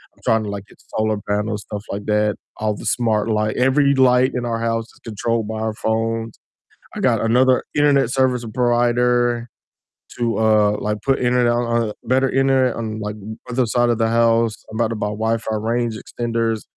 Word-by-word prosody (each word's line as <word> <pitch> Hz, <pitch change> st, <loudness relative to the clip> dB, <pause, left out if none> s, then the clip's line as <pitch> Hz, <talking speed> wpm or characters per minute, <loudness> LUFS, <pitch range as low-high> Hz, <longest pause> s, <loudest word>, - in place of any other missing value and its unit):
I'm -, -, -27 dB
trying 110 Hz, -1 st, +2 dB
to 105 Hz, -, -5 dB
like 100 Hz, -1 st, -6 dB
get -, -, -20 dB, 0.2 s
solar 110 Hz, -1 st, +1 dB
panels, 105 Hz, 0 st, -1 dB
stuff 105 Hz, -1 st, -7 dB
like 100 Hz, +1 st, -5 dB
that, 105 Hz, 0 st, +1 dB, 0.2 s
all 105 Hz, -1 st, -1 dB
the -, -, -10 dB
smart 110 Hz, -3 st, +1 dB
light 105 Hz, -1 st, 0 dB
every 140 Hz, +2 st, +3 dB
light 130 Hz, -1 st, +4 dB
in 120 Hz, -1 st, -2 dB
our 115 Hz, -1 st, -2 dB
house 115 Hz, 0 st, -1 dB
is -, -, -22 dB
controlled 115 Hz, 0 st, -2 dB
by 110 Hz, 0 st, -4 dB
our 110 Hz, -1 st, -2 dB
phones, 115 Hz, 0 st, -2 dB, 0.6 s
I -, -, -5 dB
got -, -, +2 dB
another 125 Hz, +3 st, +3 dB
internet 145 Hz, -4 st, +3 dB
service 130 Hz, -2 st, +1 dB
provider 120 Hz, 0 st, +2 dB, 0.7 s
to, 115 Hz, -2 st, 0 dB
uh, 105 Hz, -1 st, +3 dB
like 105 Hz, 0 st, -2 dB
put 135 Hz, -1 st, +1 dB
internet 125 Hz, -1 st, +2 dB
on 115 Hz, -2 st, 0 dB
better 130 Hz, +2 st, +2 dB
internet 135 Hz, -2 st, +2 dB
on 110 Hz, -1 st, -4 dB
like 105 Hz, 0 st, -4 dB, 0.3 s
other 125 Hz, 0 st, +1 dB
side 120 Hz, +2 st, +1 dB
of 120 Hz, -1 st, +1 dB
the 115 Hz, 0 st, +2 dB
house, 115 Hz, -1 st, +2 dB, 0.2 s
I'm 110 Hz, -, -7 dB
about 115 Hz, -1 st, +2 dB
to 115 Hz, -, -3 dB
buy 105 Hz, -, -2 dB
Wi-Fi 110 Hz, +1 st, -1 dB
range 115 Hz, +1 st, -1 dB
extenders, 115 Hz, -1 st, -2 dB
115 Hz, 185 wpm, -20 LUFS, 110-120 Hz, 0.7 s, light